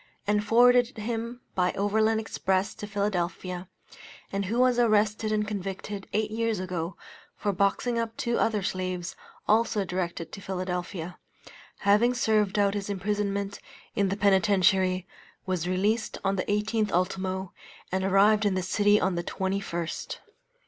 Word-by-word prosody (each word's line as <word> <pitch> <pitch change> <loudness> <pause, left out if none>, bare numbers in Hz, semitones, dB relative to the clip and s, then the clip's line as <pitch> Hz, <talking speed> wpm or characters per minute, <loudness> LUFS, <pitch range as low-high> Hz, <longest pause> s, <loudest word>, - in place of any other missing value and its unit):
and 210 0 +2
forwarded 245 +2 +5
him 230 +2 -4
by 180 -1 +2
overland 220 +2 +2
express 190 -3 -1
to 210 - -7
Philadelphia, 185 -2 -2 0.6
and 195 0 -1
who 225 +5 -2
was 250 -1 +4
arrested 215 -1 +2
and 210 -1 0
convicted, 195 0 -5
eight 215 0 0
years 225 -1 0
ago, 180 -1 -4 0.4
for 205 - -1
boxing 200 +5 +1
up 230 0 -3
two 235 -1 0
other 215 -3 +1
slaves, 185 -1 -3 0.3
also 215 -2 +2
directed 175 -2 -3
to 195 - -8
Philadelphia, 180 -2 -4 0.6
having 210 +5 +4
served 215 -4 +2
out 200 -1 +3
his 205 -1 -3
imprisonment 200 0 -2 0.4
in 200 -1 +2
the 195 - -2
Penitentiary, 190 -2 +3 0.4
was 180 -3 -1
released 210 +4 0
on 195 0 +1
the 185 - -1
18th 210 +1 0
ultimo, 185 +1 -1 0.4
and 190 +1 0
arrived 200 +3 +4
in 205 -2 +2
this 185 0 -2
city 205 0 +4
on 190 0 +1
the 170 0 -2
21st. 190 -3 -3
200 Hz, 140 wpm, -27 LUFS, 185-215 Hz, 0.6 s, forwarded